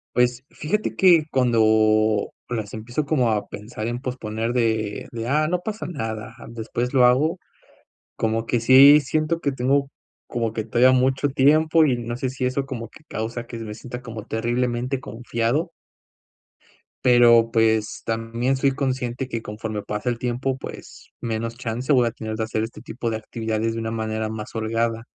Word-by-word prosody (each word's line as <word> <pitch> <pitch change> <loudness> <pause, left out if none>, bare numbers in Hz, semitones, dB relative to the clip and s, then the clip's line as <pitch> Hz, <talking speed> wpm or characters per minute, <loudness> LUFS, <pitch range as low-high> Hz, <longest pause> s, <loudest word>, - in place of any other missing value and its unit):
Pues, 125 +1 +2
fíjate 210 +8 -2
que 175 -5 +5
cuando 110 -3 +3 0.2
las 110 -4 -4
empiezo 120 +7 -3
como 130 -7 +2
a 105 -1 -1
pensar 110 +1 -6
en 120 +1 -3
posponer 115 -3 -3
de 110 -3 0
de: 115 0 -5
"Ah, 150 +3 +2
no 180 +2 0
pasa 215 +2 -5
nada, 115 -8 -5 0.2
después 120 +2 -3
lo 125 -2 +6
hago", 150 +8 +3 0.8
como 115 +1 -1
que 120 - +1
sí 135 +5 +8
siento 155 +4 -1
que 140 - 0
tengo 135 +2 +1 0.4
como 115 -2 -2
que 110 -1 -3
todavía 130 +2 +4
mucho 130 +2 +2
tiempo 155 +4 +4
y 130 -4 +2
no 120 0 -4
sé 130 0 -2
si 130 -1 -4
eso 135 +2 -1
como 120 -4 -6
que 155 - -17
causa 115 +2 -4
que 115 - -7
me 110 -2 -6
sienta 125 +2 -8
como 115 -3 -8
terriblemente 120 +3 -1
confiado 120 +7 -2 1.3
pero, 120 -2 +6
pues, 110 -1 +1
también 115 +4 -1
soy 135 +1 +2
consciente 130 -2 -2
que 115 -3 -4
conforme 105 -1 -5
pasa 105 +4 -3
el 120 - -1
tiempo, 125 +2 -2
pues, - - -10
menos 115 0 -3
chance 125 +3 -1
voy 125 -2 +4
a 115 - -1
tener 110 0 -5
que 110 - -2
hacer 110 0 -2
este 115 -1 -7
tipo 120 -1 -4
de 110 - -2
actividades 110 0 -2
de 115 - -4
una 115 0 -3
manera 110 -1 -2
más 110 -1 -6
holgada. 115 +1 -1
120 Hz, 170 wpm, -23 LUFS, 110-130 Hz, 1.3 s, sí